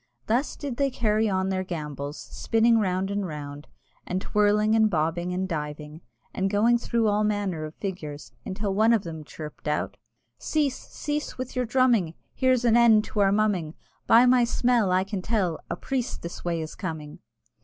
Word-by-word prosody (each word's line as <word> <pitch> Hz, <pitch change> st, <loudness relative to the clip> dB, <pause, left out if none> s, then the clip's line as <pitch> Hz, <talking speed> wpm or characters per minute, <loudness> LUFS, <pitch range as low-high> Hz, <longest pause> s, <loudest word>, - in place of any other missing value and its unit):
Thus 245 Hz, +6 st, 0 dB
did 275 Hz, -4 st, -5 dB
they 280 Hz, -1 st, +2 dB
carry 220 Hz, -3 st, +1 dB
on 190 Hz, 0 st, 0 dB
their 185 Hz, -1 st, -1 dB
gambols, 150 Hz, -4 st, -5 dB
spinning 225 Hz, 0 st, +1 dB
round 190 Hz, -1 st, 0 dB
and 200 Hz, 0 st, -1 dB
round, 145 Hz, -1 st, -7 dB, 0.4 s
and 180 Hz, -, -2 dB
twirling 210 Hz, +2 st, +2 dB
and 220 Hz, -1 st, +4 dB
bobbing 170 Hz, +1 st, -1 dB
and 185 Hz, +1 st, -1 dB
diving, 150 Hz, -1 st, -5 dB, 0.3 s
and 190 Hz, +1 st, 0 dB
going 225 Hz, +4 st, +3 dB
through 235 Hz, -1 st, 0 dB
all 210 Hz, 0 st, +2 dB
manner 200 Hz, -7 st, -1 dB
of 155 Hz, -, -9 dB
figures, 155 Hz, -7 st, -6 dB
until 195 Hz, +1 st, -3 dB
one 220 Hz, +3 st, +4 dB
of 220 Hz, -4 st, +2 dB
them 160 Hz, -2 st, -7 dB
chirped 150 Hz, 0 st, -9 dB
out, 150 Hz, -, -1 dB, 0.4 s
"Cease, 290 Hz, -4 st, -1 dB
cease, 295 Hz, 0 st, -4 dB
with 255 Hz, 0 st, -6 dB
your 250 Hz, 0 st, 0 dB
drumming, 235 Hz, -9 st, +2 dB, 0.2 s
Here's 255 Hz, -2 st, +2 dB
an 230 Hz, -1 st, +5 dB
end 230 Hz, -3 st, +6 dB
to 210 Hz, -, -1 dB
our 195 Hz, -1 st, +4 dB
mumming; 200 Hz, -7 st, 0 dB, 0.3 s
By 235 Hz, +2 st, +7 dB
my 250 Hz, -1 st, +5 dB
smell 235 Hz, -3 st, +2 dB
I 185 Hz, +1 st, +3 dB
can 195 Hz, -1 st, -4 dB
tell 185 Hz, -6 st, 0 dB
A -, -, -2 dB
priest 265 Hz, -2 st, -3 dB
this 170 Hz, -, -7 dB
way 170 Hz, -2 st, -1 dB
is 155 Hz, -, -6 dB
coming!" 160 Hz, -5 st, -6 dB
200 Hz, 180 wpm, -26 LUFS, 165-230 Hz, 0.4 s, By